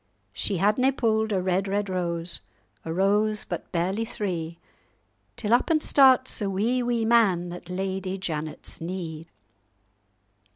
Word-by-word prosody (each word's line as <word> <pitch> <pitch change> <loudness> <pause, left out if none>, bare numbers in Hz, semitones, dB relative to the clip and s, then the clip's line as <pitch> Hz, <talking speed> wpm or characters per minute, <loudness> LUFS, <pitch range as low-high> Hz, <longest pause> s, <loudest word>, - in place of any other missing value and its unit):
"She 195 - -1
hadna 215 +8 +3
pu'd 220 -3 +1
a 195 - +2
red, 185 +1 0
red 200 +1 -1
rose, 170 -2 -2 0.4
A 160 - -5
rose 210 +4 +2
but - - -6
barely 190 +5 0
three; 170 -7 -4 0.8
Till 220 -1 0
up 240 - +3
and 310 -2 +2
starts 260 -3 +4
a 200 - 0
wee, 225 +7 +1
wee 240 -2 0
man 190 -7 +3
At 175 0 -10
Lady 190 +1 -3
Janet's 155 -5 -5
knee. 165 -2 -5
195 Hz, 135 wpm, -26 LUFS, 175-220 Hz, 0.8 s, starts